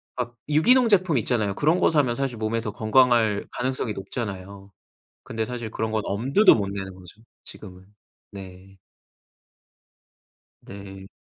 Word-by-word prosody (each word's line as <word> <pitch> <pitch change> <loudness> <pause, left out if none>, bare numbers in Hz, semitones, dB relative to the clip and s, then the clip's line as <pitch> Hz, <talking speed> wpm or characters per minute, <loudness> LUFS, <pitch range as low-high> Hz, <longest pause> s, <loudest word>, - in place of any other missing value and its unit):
막 120 -1 -4
유기농 235 - +4
제품 185 - +3
있잖아요. 110 -4 -1
그런 160 +5 +2
거 - - +4
사면 145 -7 +2
사실 130 -3 -3
몸에 110 +1 -1
더 110 - -4
건강할 110 -1 +2
가능성이 125 -3 -3
높잖아요. 100 -1 -7 0.6
근데 110 0 -3
사실 120 -1 -6
그런 110 0 -3
건 110 - 0
엄두도 135 - +4
못 100 -3 -2
내는 95 -1 -6
거죠, 95 +3 -15 0.2
지금은. 95 -2 -12 0.4
네. 95 0 -12 1.8
네. 95 -1 -11
110 Hz, 275 characters per minute, -24 LUFS, 100-130 Hz, 1.8 s, 유기농